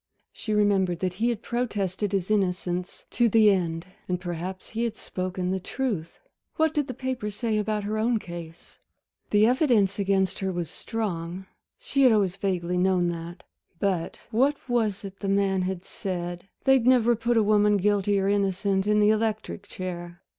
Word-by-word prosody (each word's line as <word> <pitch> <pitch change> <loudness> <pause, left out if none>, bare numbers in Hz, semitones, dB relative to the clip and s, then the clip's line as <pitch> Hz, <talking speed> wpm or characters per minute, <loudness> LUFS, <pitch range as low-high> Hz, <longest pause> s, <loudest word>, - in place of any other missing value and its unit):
She 215 - -5
remembered 200 -4 +2
that 185 -1 0
he 235 - +3
had 230 -2 -3
protested 205 -5 -2
his 195 0 -1
innocence 180 -3 -1
to 240 -1 +3
the 215 -1 +6
end. 165 -3 -1 0.2
And 180 -1 0
perhaps 180 +1 -5
he 225 +1 -2
had 230 -2 -2
spoken 185 0 -3
the 190 - 0
truth. 195 -5 -3 0.4
What 315 -1 +2
did 295 -2 0
the 255 - -5
papers 250 -6 -3
say 220 -1 0
about 210 0 -1
her 215 +1 -2
own 230 +1 +2
case? 170 -4 -9 0.5
The 210 +1 +5
evidence 235 - +3
against 190 -1 +1
her 190 -1 -1
was 175 -3 -3
strong 185 -4 -4 0.3
she - - -1
had 255 -2 +7
always 200 -4 +2
vaguely 180 -2 -1
known 180 -1 +2
that. 170 +1 -6 0.3
But 180 -2 -1
what 275 +6 +3
was 225 -4 0
it 195 0 -9
the 200 - -3
man 195 -1 +2
had 185 0 -3
said? 175 -1 -4 0.2
they'd 265 -3 +4
never 240 -2 +5
put 235 +1 0
a 220 - +5
woman, 210 0 +4
guilty 200 0 +2
or 195 - 0
innocent, 195 0 +1
in 210 0 +4
the 210 +1 +5
electric 215 -2 -2
chair. 175 -2 -6
200 Hz, 175 wpm, -26 LUFS, 180-220 Hz, 0.5 s, had